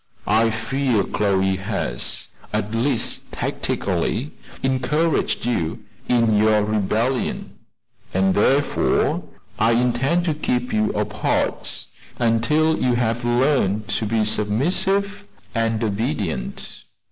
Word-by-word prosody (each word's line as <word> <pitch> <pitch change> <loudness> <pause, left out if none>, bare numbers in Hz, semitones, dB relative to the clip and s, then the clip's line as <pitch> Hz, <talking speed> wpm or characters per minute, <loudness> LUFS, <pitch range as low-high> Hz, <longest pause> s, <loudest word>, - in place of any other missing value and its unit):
I 115 +2 +3
fear 115 0 0
Chloe 95 -1 +1
has, - - -1 0.2
at 105 0 -2
least 120 +1 0
tacitly, 100 - -2 0.3
encouraged 135 +3 0
you 85 -10 -2 0.3
in 115 -3 +3
your 105 0 +4
rebellion, 110 +4 -1 0.6
and 95 0 +2
therefore 135 +7 +2 0.4
I 115 +1 +4
intend 125 +8 +1
to 160 - +1
keep 125 -5 -2
you 110 0 +2
apart 105 0 -1 0.3
until 150 +8 +2
you 125 -1 +2
have 120 0 0
learned 120 -4 +1
to 110 - 0
be 110 0 +1
submissive 185 - +1 0.3
and 115 -1 0
obedient." 105 - -3
115 Hz, 100 wpm, -22 LUFS, 105-130 Hz, 0.6 s, your